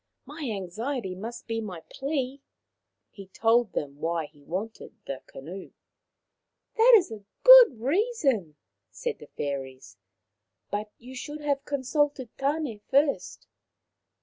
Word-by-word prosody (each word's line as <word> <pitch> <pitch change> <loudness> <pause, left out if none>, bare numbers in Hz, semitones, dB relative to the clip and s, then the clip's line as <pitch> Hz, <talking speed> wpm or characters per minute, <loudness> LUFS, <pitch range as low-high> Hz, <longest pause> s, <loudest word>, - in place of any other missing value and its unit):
My 290 -1 -6
anxiety 210 +3 -3
must 230 +6 -7
be 225 -1 -2
my 185 -6 -6
plea." 275 -1 -3 0.7
He 195 -2 -11
told 225 +2 +2
them 145 -1 -4
why 165 0 -1
he 145 0 -18
wanted 200 +9 -6
the 135 -1 -5
canoe. 175 +8 -9 0.5
" - - -56
That 475 +3 +7
is 355 - -1
a 215 -2 -8 0.2
good - - +10
reason," 275 - 0 0.3
said - - -4
the - - -12
fairies, 130 -7 -6 0.4
" 105 +1 -52
but 210 +1 -2
you 250 +2 -12
should 295 +3 -6
have 285 -1 -1
consulted 280 -2 -1
Tan6 275 -6 -1
first. 280 +1 +1
230 Hz, 130 wpm, -27 LUFS, 185-285 Hz, 0.7 s, good